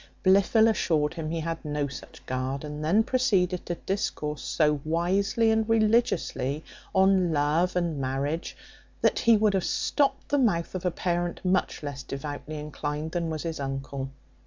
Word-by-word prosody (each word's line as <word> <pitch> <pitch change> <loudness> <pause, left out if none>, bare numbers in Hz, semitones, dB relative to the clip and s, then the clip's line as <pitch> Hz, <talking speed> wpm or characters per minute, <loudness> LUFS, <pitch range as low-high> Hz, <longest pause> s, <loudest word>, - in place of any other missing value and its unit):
Blifil 200 +4 +5
assured 160 -9 +1
him 160 -2 -4
he 165 0 -2
had 165 +1 -4
no 150 -2 -1
such 140 - -11
guard; 130 +2 -3
and 150 0 -6
then 195 +8 +4
proceeded 200 -9 +1
to 175 - -1
discourse 150 -6 -3
so 150 -2 +1
wisely 195 +7 +1
and 220 0 +1
religiously 210 - +1 0.3
on 190 -2 +4
love 155 +5 +1
and 170 -4 0
marriage, 135 +5 -2 0.4
that - - +3
he 230 -1 +5
would 210 -1 +3
have 190 -2 +1
stopt 280 -1 0
the 285 - +2
mouth 185 -10 +1
of 185 -1 -2
a - - +4
parent 175 +1 -2
much 185 -3 0
less 140 -2 -5
devoutly 145 +3 -6
inclined 150 +1 -4
than 170 -1 -1
was 155 -2 -3
his 165 -2 -4
uncle. 135 0 -4
165 Hz, 160 wpm, -27 LUFS, 150-195 Hz, 0.4 s, Blifil